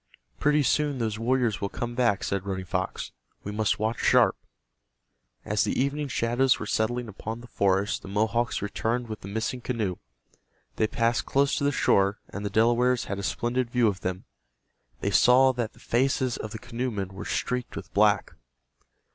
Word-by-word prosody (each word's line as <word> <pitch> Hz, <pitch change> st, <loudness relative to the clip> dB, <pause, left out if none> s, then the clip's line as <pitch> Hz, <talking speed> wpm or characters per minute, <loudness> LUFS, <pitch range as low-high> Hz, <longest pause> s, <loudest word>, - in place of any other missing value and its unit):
"Pretty 150 Hz, 0 st, +3 dB
soon 145 Hz, +1 st, +1 dB
those 110 Hz, -3 st, -2 dB
warriors 120 Hz, -2 st, +1 dB
will 100 Hz, -, -1 dB
come 120 Hz, +3 st, -4 dB
back," 120 Hz, -5 st, +1 dB
said 100 Hz, -1 st, -1 dB
Running 95 Hz, -1 st, -4 dB
Fox. -, -, -3 dB, 0.3 s
"We 100 Hz, -, -5 dB
must 105 Hz, 0 st, +1 dB
watch 110 Hz, +2 st, -1 dB
sharp." -, -, +4 dB, 1.1 s
As -, -, +1 dB
the -, -, -1 dB
evening 140 Hz, +2 st, 0 dB
shadows 120 Hz, +1 st, +2 dB
were -, -, -5 dB
settling 120 Hz, +3 st, -1 dB
upon 110 Hz, +2 st, -6 dB
the -, -, -11 dB
forest 100 Hz, -3 st, +1 dB
the -, -, -11 dB
Mohawks 110 Hz, +3 st, 0 dB
returned 115 Hz, +4 st, -1 dB
with 110 Hz, -, -6 dB
the -, -, -8 dB
missing 110 Hz, +4 st, -3 dB
canoe. 110 Hz, -8 st, -2 dB, 0.8 s
They 110 Hz, -, +2 dB
passed 115 Hz, +2 st, 0 dB
close 140 Hz, 0 st, +2 dB
to -, -, -1 dB
the 145 Hz, -, +3 dB
shore, 100 Hz, -6 st, +2 dB
and 100 Hz, -, -6 dB
the 100 Hz, -, -1 dB
Delawares 120 Hz, +4 st, +3 dB
had 100 Hz, -, -4 dB
a -, -, -3 dB
splendid 120 Hz, +5 st, -1 dB
view 120 Hz, -1 st, +3 dB
of 100 Hz, -3 st, -1 dB
them. 90 Hz, 0 st, -4 dB, 0.8 s
They -, -, 0 dB
saw 130 Hz, +2 st, +6 dB
that 120 Hz, -3 st, -3 dB
the -, -, -20 dB
faces 130 Hz, 0 st, +1 dB
of 110 Hz, -, -5 dB
the 110 Hz, -, -6 dB
canoemen 115 Hz, -4 st, -3 dB
were 95 Hz, -1 st, -8 dB
streaked 125 Hz, 0 st, -2 dB
with -, -, -8 dB
black. -, -, +3 dB
115 Hz, 180 wpm, -27 LUFS, 105-125 Hz, 1.1 s, saw